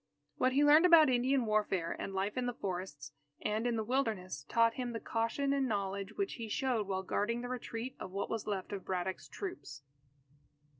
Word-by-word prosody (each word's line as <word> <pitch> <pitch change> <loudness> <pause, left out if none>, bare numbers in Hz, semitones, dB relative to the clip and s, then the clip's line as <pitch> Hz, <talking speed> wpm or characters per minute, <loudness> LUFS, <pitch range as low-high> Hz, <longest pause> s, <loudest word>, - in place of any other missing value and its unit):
What 255 0 +2
he 285 +2 +4
learned 305 +4 +7
about 320 -5 +7
Indian 255 +1 +2
warfare 205 -6 0
and - - -4
life 195 +2 -2
in 250 -1 -1
the 245 - -2
forests 175 -8 -5 0.3
and 215 +3 -1
in 240 - +1
the 220 - -1
Wilderness, 210 - -1
taught 230 0 +4
him 245 -1 -4
the 225 - -3
caution 230 +6 0
and 275 -1 +1
knowledge 200 -3 -2
which 395 -1 -2
he 225 - -4
showed 240 -3 0
while 190 -1 -2
guarding 230 +5 -1
the 245 - -5
retreat 250 0 -5
of - - -6
what 200 +2 -3
was 225 -2 -4
left 195 -3 -3
of 195 -2 -4
Braddock's 185 0 -3
troops. 360 - -7
225 Hz, 195 wpm, -33 LUFS, 195-255 Hz, 0.3 s, learned